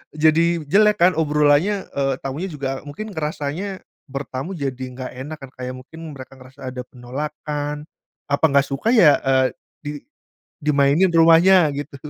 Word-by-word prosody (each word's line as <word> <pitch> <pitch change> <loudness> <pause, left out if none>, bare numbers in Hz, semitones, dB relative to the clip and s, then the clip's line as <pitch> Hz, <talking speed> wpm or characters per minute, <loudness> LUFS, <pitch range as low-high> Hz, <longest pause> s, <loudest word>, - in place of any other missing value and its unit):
jadi 160 +2 +3
jelek 205 +4 +3
kan 180 - +6
obrolannya, 150 +6 +2
eee, 135 -1 0
tamunya 140 +8 -3
juga 145 -6 -4 0.2
mungkin 215 +9 -7
ngerasanya 160 +4 -4 0.2
bertamu 135 +5 -5
jadi 135 -4 -4
nggak 130 -1 -6
enak 155 +2 -7
kan, 135 -1 -10
kayak 125 0 -5
mungkin 130 +6 -12 0.2
mereka 130 0 -11
ngerasa 130 +2 -16
ada 125 0 -5
penolakan. 145 +3 -5 0.5
Apa 140 - 0
nggak 140 -2 +3
suka 135 +11 -1
ya, 155 -10 +6
eee, 130 -1 +2 0.4
di 145 - -4 0.7
dimainin 145 +3 +3
rumahnya 165 0 +6
gitu. 145 0 -6
150 Hz, 145 wpm, -21 LUFS, 135-165 Hz, 0.7 s, kan